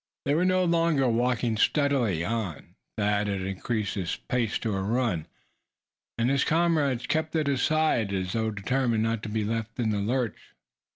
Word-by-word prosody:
They 140 - +2
were 170 +4 +2
no 185 0 +3
longer 165 -5 +2
walking 120 -1 +1
steadily 120 - +2
on. 110 -8 -4 0.2
Thad 105 0 +1
had 100 -2 -2
increased 95 +2 -2
his 90 -4 -2
pace 120 -3 -1
to 110 -4 -2
a 95 - -1
run, 105 -5 0 0.9
and 115 +1 +1
his 140 -1 +2
comrades 155 -6 +1
kept 160 0 -1
at 155 -1 +1
his 140 -3 0
side, 155 -10 +2
as 95 -2 -2
though 110 -1 0
determined 115 +2 0
not 115 -1 -1
to 110 - -5
be 105 0 -1
left 115 0 -3
in 110 -3 +1
the 105 - 0
lurch. 120 +3 -2
115 Hz, 175 wpm, -27 LUFS, 105-140 Hz, 0.9 s, no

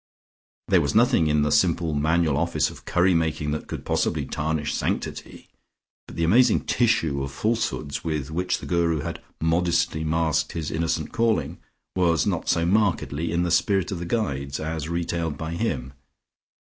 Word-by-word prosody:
There - - +4
was - - -1
nothing 80 - +4
in 75 -1 +2
the 75 - 0
simple 85 -3 +2
manual 80 +1 +2
office 80 -1 0
of - - -14
curry 90 +1 +3
making 80 -3 0
that 75 - -4
could - - -6
possibly - - 0
tarnish 75 -1 -2
sanctity, - - -4 0.6
but - - -11
the 85 - -1
amazing 115 +10 +4
tissue 80 - +1
of 70 0 -4
falsehoods 105 -6 -2
with 75 -4 -3
which 90 +3 0
the - - -9
Guru 85 -3 +1
had - - -5 0.2
modestly 85 -1 +1
masked 80 0 0
his 80 -2 -3
innocent 80 -1 -1
calling 115 -1 0 0.4
was 85 -5 +2
not - - -1
so 85 - +2
markedly 85 -5 +1
in 85 +1 +1
the 85 - -1
spirit 95 +1 +2
of 95 - -3
the 85 - -4
Guides, 70 - -2
as 80 0 -4
retailed 85 -3 -2
by 80 +1 -5
him. 75 - -2
80 Hz, 165 wpm, -24 LUFS, 75-85 Hz, 0.6 s, There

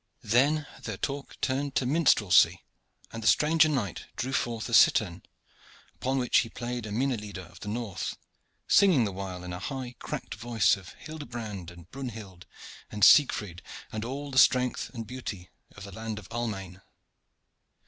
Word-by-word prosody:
Then 140 +7 +3 0.2
their 110 -6 -5
talk 140 +7 -5
turned 135 +1 -1
to 130 - +1
minstrelsy, 125 - +4 0.5
and 115 - -5
the 110 - -1
stranger 155 +1 +5
knight 115 - -2
drew 130 +2 -3
forth 115 -4 -1
a 120 - -6
cittern, 95 -5 +5 0.7
upon 130 +1 -2
which 125 -2 +3
he 115 - -1
played 120 -1 -5
the - - -6
minne 130 +4 +1
lieder 100 -3 -7
of 85 0 -15
the - - -9
north, 110 -2 -4 0.5
singing 185 - +5
the 105 - -1
while 95 -1 -6
in 90 0 -6
a 90 - -5
high 130 +2 -5
cracked - - -5
voice 115 -3 +2
of 95 -1 -12
Hildebrand 115 - -7
and 85 -1 -14
Brunhild 110 -9 -8 0.4
and 105 -1 +3
Siegfried, 105 - +5 0.3
and 110 0 -4
all 140 +4 -5
the 130 - +4
strength 125 -1 +3
and 115 -3 -6
beauty 105 -6 -7 0.2
of 100 - -10
the 100 - -9
land 110 +2 -5
of 105 -4 -9
Almain. 100 -6 -4
115 Hz, 165 wpm, -28 LUFS, 100-130 Hz, 0.7 s, stranger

